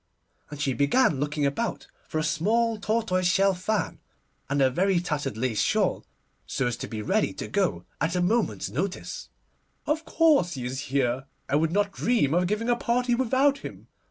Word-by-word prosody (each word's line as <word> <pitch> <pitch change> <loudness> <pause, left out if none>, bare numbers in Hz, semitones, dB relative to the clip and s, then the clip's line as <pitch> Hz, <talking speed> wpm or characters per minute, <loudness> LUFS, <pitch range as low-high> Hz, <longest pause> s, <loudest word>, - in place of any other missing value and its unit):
and 150 -1 -8
she 140 -3 0
began 145 - +3
looking 145 0 -1
about 185 +12 -2 0.2
for - - -3
a 155 - +1
small 220 +9 +1
tortoise 205 -4 0
shell 195 +2 +3
fan 195 +3 -2 0.5
and 140 +1 0
a 135 - +5
very 185 +5 +2
tattered 145 -8 -3
lace 115 -2 0
shawl, - - +1 0.4
so 135 - -1
as 120 -1 0
to - - -6
be 110 -2 -5
ready 210 - +1
to - - -6
go 195 -4 0 0.2
at 165 +2 0
a - - +1
moment's 180 - 0
notice. 185 +7 -4 0.6
'Of 310 +2 0
course 305 - +3
he 130 -4 -5
is 130 +2 -3
here; 135 -1 0 0.2
I 140 - 0
would 160 +2 +2
not 205 +2 +1
dream 215 - +1
of 180 +1 +2
giving 210 +4 -1
a 240 - +3
party 245 +1 0
without 260 +3 +2
him. - - -10
180 Hz, 185 wpm, -26 LUFS, 140-225 Hz, 0.6 s, a